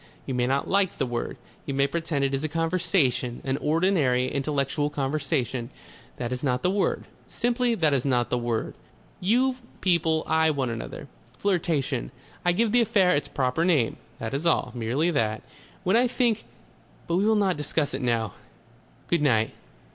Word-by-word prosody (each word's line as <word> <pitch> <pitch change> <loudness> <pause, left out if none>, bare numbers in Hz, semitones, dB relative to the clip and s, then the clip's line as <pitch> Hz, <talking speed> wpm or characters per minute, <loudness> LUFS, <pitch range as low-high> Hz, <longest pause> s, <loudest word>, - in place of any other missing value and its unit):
You 135 - -3
may 125 -1 +1
not 135 +2 0
like 195 -2 +1
the - - 0
word. 120 -1 -3 0.3
You 140 - -2
may 140 0 +3
pretend 160 -2 -1
it 135 - -1
is 135 +2 -1
a 155 - -1
conversation, 165 -7 +1
an 135 0 -1
ordinary 150 -7 +2
intellectual 140 +1 0
conversation. 135 -4 -1 0.5
That 120 -1 -3
is 125 0 -3
not 125 -3 0
the 180 - +3
word. 200 0 0 0.2
Simply 240 0 +1
that 155 -7 +2
is 130 -3 +1
not 125 -3 +1
the 125 - +2
word. 120 -2 -2 0.5
You 250 +7 +2 0.2
people 160 -3 +2
eye 160 0 +3
one 135 -5 -1
another.... 115 +5 -6 0.3
Flirtation. 160 - 0 0.3
I 175 - +3
give 215 +5 +1
the 245 +1 +5
affair 190 -5 +3
its 145 - -1
proper 130 +4 0
name. 155 -10 +2 0.2
That 110 +1 -5
is 140 +3 -1
all. 160 -7 +2
Merely 125 +8 0
that. 110 -7 0 0.4
When 190 +2 +2
I 245 +2 +4
think 240 -3 0 0.6
But 170 - 0
we 195 - +2
will 220 - +4
not 195 -3 +2
discuss 150 0 -1
it - - -3
now.... 115 -5 0 0.7
Good 170 -3 +1
night.... 110 -6 +3
150 Hz, 175 wpm, -26 LUFS, 125-180 Hz, 0.7 s, the